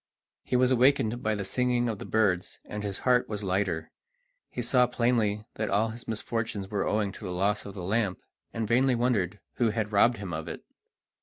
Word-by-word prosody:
He - - -2
was 125 +1 +4
awakened 125 -2 +3
by 110 0 0
the 100 -1 -4
singing 125 +2 +1
of 110 -4 -3
the - - -7
birds, 100 -4 +1
and 105 - -5
his 100 -2 -3
heart 125 -1 +3
was 105 -1 -3
lighter. 95 -3 -1 0.6
He 120 - -4
saw 125 +1 +4
plainly 115 -4 +1
that 110 0 -1
all 105 +3 +2
his 115 +2 -9
misfortunes 110 -3 -3
were 100 -2 0
owing 105 -2 +1
to - - -11
the 90 - -4
loss 100 +4 0
of 100 - -9
the 90 - -6
lamp, 100 0 0 0.3
and 115 -1 -3
vainly 125 +3 +3
wondered 105 -5 0 0.2
who 120 -2 +3
had 110 -1 -2
robbed 115 +3 +4
him 95 -4 -6
of 80 0 -4
it. 80 - -7
110 Hz, 205 wpm, -28 LUFS, 100-120 Hz, 0.6 s, was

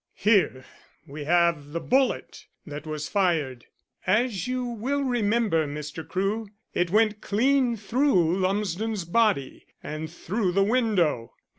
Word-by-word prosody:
"Here 195 -11 +2 0.4
we 145 +1 -8
have 170 -3 +2
the 170 - -1
bullet 260 +6 0 0.2
that 150 0 -8
was 155 -1 -4
fired. 160 - 0 0.4
As 215 +2 +1
you 255 0 -1
will 245 +5 -2
remember, 220 - +1
Mr. 150 +2 -6
Crewe, 205 +4 -1 0.3
it 175 -1 +1
went 215 +2 +2
clean 250 +2 +2
through 200 - +2
Lumsden's 200 +1 -1
body, 185 - 0 0.2
and 155 +1 -5
through 185 +2 -2
the 195 +1 +3
window. 195 - +1
195 Hz, 125 wpm, -26 LUFS, 160-225 Hz, 0.4 s, the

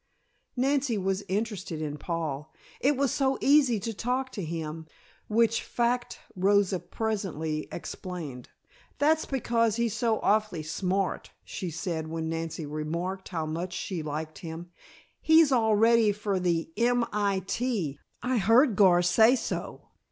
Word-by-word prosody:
Nancy 265 -2 +1
was 195 0 -1
interested 195 -5 -3
in 150 -2 -3
Paul; 155 -3 -4 0.3
it 280 +1 +2
was 275 -3 +1
so 270 -1 +1
easy 275 -6 +4
to 225 +2 -3
talk 255 +4 -2
to 200 - -5
him 160 -1 -5 0.4
which 230 +1 +2
fact 240 +1 -1 0.2
Rosa 195 0 +3
presently 175 -10 -3
explained. 165 -8 -7 0.5
"That's 315 +2 +3
because 230 -4 +1
he's 235 -2 0
so 225 -2 +1
awfully 210 -6 +1
smart," 185 +4 -2
she 185 - -5
said 165 -1 -3
when 160 0 -3
Nancy 165 -1 -4
remarked 170 +6 -4
how 165 -4 -2
much 170 +3 -4
she 180 -2 -3
liked 155 +1 -5
him. 170 +1 -8 0.5
"He's 320 -2 +6
all 220 -4 +3
ready 225 0 +5
for 205 -2 -2
the 170 -2 0
M. 240 +1 +2
I. 200 -2 0
T. 195 - -2 0.2
I 250 -1 +1
heard 225 +4 +5
Gar 180 -4 +5
say 220 +8 +5
so." - - -5
195 Hz, 140 wpm, -28 LUFS, 165-235 Hz, 0.5 s, He's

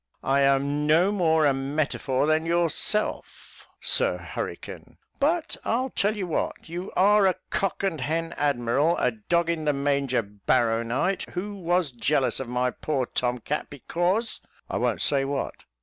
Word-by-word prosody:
"I 135 +1 +2
am 140 +2 +2
no 170 +6 +4
more 160 -6 +3
a 140 - +4
metafore 135 -1 -1
than 155 +1 +2
yourself, 170 +5 -1
Sir - - +1
Hurricane; - - -7 0.2
but 320 +3 0
I'll 255 +3 0
tell 210 +2 +1
you 195 - -2
what, 170 - -3
you 175 +3 -6
are 200 +1 +5
a 185 - +2 0.2
cock 195 0 -1
and 165 -7 -1
hen 165 +5 -2
admiral, 145 +3 +1
a 125 - +2
dog 170 +10 0
in 160 -2 -3
the 150 - +2
manger 140 -3 0
barrownight, 115 - 0
who 205 +4 -3
was 175 -4 0
jealous 130 +1 0
of 135 -3 -5
my 125 +1 0
poor 135 -2 -2
tom 125 0 -1
cat, 150 +6 -3
because, 175 - 0 0.3
I - - -1
won't - - 0
say 140 -1 +2
what. 135 0 -4
150 Hz, 155 wpm, -26 LUFS, 135-180 Hz, 0.3 s, are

